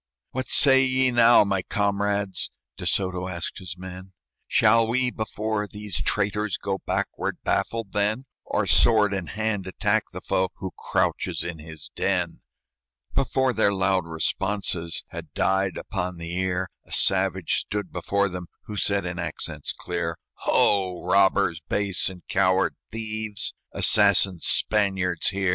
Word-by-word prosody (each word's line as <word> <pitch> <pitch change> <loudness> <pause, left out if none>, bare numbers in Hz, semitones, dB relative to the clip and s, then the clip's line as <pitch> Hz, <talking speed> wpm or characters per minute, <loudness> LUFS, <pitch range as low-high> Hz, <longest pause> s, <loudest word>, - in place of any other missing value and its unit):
"What 130 0 -3
say 135 -1 +5
ye 130 0 +2
now, 120 -1 +6
my 100 -2 0
comrades?" 100 -1 -1 0.3
De - - -5
Soto 90 -1 0
asked 85 +1 -4
his 90 -2 -8
men; 95 +1 -9 0.3
"Shall 115 +1 +4
we, 125 +2 +1
before 110 -1 -3
these 105 -3 -5
traitors, 105 -1 0
Go 95 -1 -3
backward, - - -2
baffled, 115 -4 -1
then; 105 +5 0 0.2
Or, - - -1
sword 105 -3 +4
in 95 -4 -3
hand, 105 -2 -2
attack 95 - +1
the - - -6
foe 95 0 0
Who 95 -2 -6
crouches - - -1
in 85 -2 -5
his 80 -1 -10
den?" 90 -3 -1 0.7
Before 130 -1 +1
their 110 -2 +3
loud 95 -3 +1
responses 85 +1 -1
Had - - -8
died 95 -1 +1
upon 90 -3 -4
the 85 0 -6
ear, 95 0 -1
A - - -21
savage 95 -2 +4
stood 105 -3 -4
before 100 +3 0
them, 90 -2 -6 0.2
Who 105 - -7
said, 100 0 +1
in 90 0 -4
accents 85 -3 -4
clear, 85 -2 -4 0.3
"Ho! 95 -3 +2
robbers 95 -3 +3
base 100 -3 0
and 90 -2 -11
coward 95 0 +2 0.2
thieves! 110 -1 -3 0.2
Assassin 100 -3 +4
Spaniards, 95 -5 +1
hear! 95 -1 0
95 Hz, 140 wpm, -25 LUFS, 90-105 Hz, 0.7 s, now